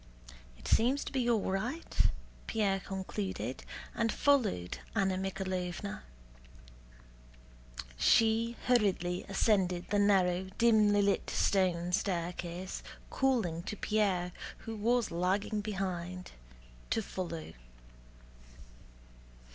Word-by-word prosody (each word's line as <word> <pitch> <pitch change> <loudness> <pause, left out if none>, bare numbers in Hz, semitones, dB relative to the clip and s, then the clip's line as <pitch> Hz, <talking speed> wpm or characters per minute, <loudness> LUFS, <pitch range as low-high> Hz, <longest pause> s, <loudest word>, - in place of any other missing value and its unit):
"It - - -10
seems 255 +5 +3
to - - -6
be 255 -3 0
all 220 -5 +1
right," 245 - -3 0.5
Pierre 200 -3 +1
concluded, 190 - -4 0.3
and 230 -1 +1
followed 220 - +1 0.2
Anna 195 -3 +2
Mikháylovna. 190 0 -3 2.0
She 225 - +4
hurriedly 195 -7 +2
ascended 190 -3 +1
the 205 - +3
narrow 190 -2 +3
dimly 215 -3 +5
lit 200 0 +1
stone 180 -3 +1
staircase, 180 -1 -2 0.3
calling 225 -12 +1
to 210 +4 -6
Pierre, 195 -5 +1 0.3
who 225 - -4
was 235 +3 +1
lagging 190 +5 0
behind, 185 -3 -4 0.6
to 225 - +1
follow. 170 - -5
195 Hz, 90 wpm, -32 LUFS, 180-220 Hz, 2.0 s, dimly